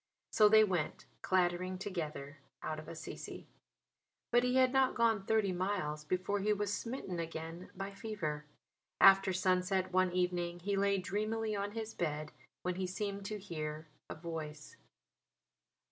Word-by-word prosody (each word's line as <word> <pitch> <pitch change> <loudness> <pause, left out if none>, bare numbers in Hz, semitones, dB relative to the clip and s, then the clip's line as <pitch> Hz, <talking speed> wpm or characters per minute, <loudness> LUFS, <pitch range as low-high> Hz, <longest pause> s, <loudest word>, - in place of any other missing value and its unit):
So 210 -1 +6
they 215 0 +8
went 180 -7 -1 0.2
clattering 185 0 +1
together 155 -7 -5 0.2
out 155 - -3
of 155 - -10
Assisi. 165 - -7 0.9
But 240 0 +5
he 250 0 +2
had 260 0 +5
not 265 -1 +3
gone 225 -4 +2
thirty 220 -3 +3
miles 180 -5 -2
before 185 +5 0
he 210 +2 +1
was 205 0 -1
smitten 230 -8 -4
again 165 +1 -5
by 195 +1 -4
fever. 195 -8 -4 0.5
After 195 0 +8
sunset 185 0 +1
one 185 0 +3
evening 175 -1 -1
he 200 +3 0
lay 200 0 +3
dreamily 215 +3 -1
on 200 0 -2
his 225 -1 -4
bed 155 -2 -2 0.3
when 180 0 -1
he 190 -1 -1
seemed 200 +1 -3
to 210 +1 -3
hear 155 -5 -5 0.2
a - - -5
voice. 155 -2 -6
185 Hz, 145 wpm, -34 LUFS, 170-205 Hz, 0.9 s, they